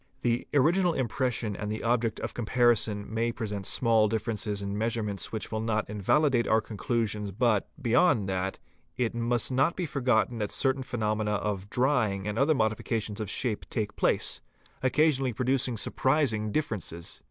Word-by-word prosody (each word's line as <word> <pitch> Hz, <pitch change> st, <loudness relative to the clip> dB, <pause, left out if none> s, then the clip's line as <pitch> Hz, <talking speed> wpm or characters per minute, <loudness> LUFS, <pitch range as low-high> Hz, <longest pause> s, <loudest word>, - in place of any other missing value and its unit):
The 120 Hz, 0 st, 0 dB
original 170 Hz, +5 st, +4 dB
impression 125 Hz, -4 st, -1 dB
and 105 Hz, +1 st, -4 dB
the 110 Hz, -, -4 dB
object 115 Hz, -1 st, +1 dB
of -, -, -4 dB
comparison 115 Hz, -3 st, +1 dB
may 115 Hz, +1 st, -1 dB
present 105 Hz, -4 st, -4 dB
small 115 Hz, -3 st, +3 dB
differences 105 Hz, -1 st, -2 dB
in 100 Hz, 0 st, -4 dB
measurements 105 Hz, -4 st, -2 dB
which 110 Hz, -2 st, -4 dB
will 110 Hz, -, -1 dB
not 110 Hz, -1 st, -1 dB
invalidate 120 Hz, +5 st, +2 dB
our 110 Hz, -, +4 dB
conclusion 105 Hz, -1 st, -2 dB
but, 115 Hz, -5 st, +2 dB
beyond 125 Hz, -, +3 dB
that, 95 Hz, 0 st, -2 dB, 0.4 s
it 125 Hz, -3 st, 0 dB
must 120 Hz, +1 st, 0 dB
not 135 Hz, +6 st, +2 dB
be 180 Hz, -, -2 dB
forgotten 125 Hz, -5 st, +1 dB
that 105 Hz, -1 st, -1 dB
certain 135 Hz, 0 st, +1 dB
phenomena 110 Hz, -4 st, -1 dB
of 100 Hz, -1 st, -2 dB
'drying 115 Hz, -7 st, +1 dB
and 105 Hz, +1 st, -2 dB
other 150 Hz, +3 st, +4 dB
modifications 110 Hz, -1 st, -1 dB
of 105 Hz, -, -4 dB
shape 110 Hz, 0 st, -1 dB
take 105 Hz, -3 st, -2 dB
place, -, -, +1 dB, 0.4 s
occasionally 135 Hz, -1 st, +2 dB
producing 125 Hz, +1 st, 0 dB
surprising 120 Hz, -4 st, +1 dB
differences. 100 Hz, -, -3 dB
115 Hz, 155 wpm, -28 LUFS, 105-125 Hz, 0.4 s, original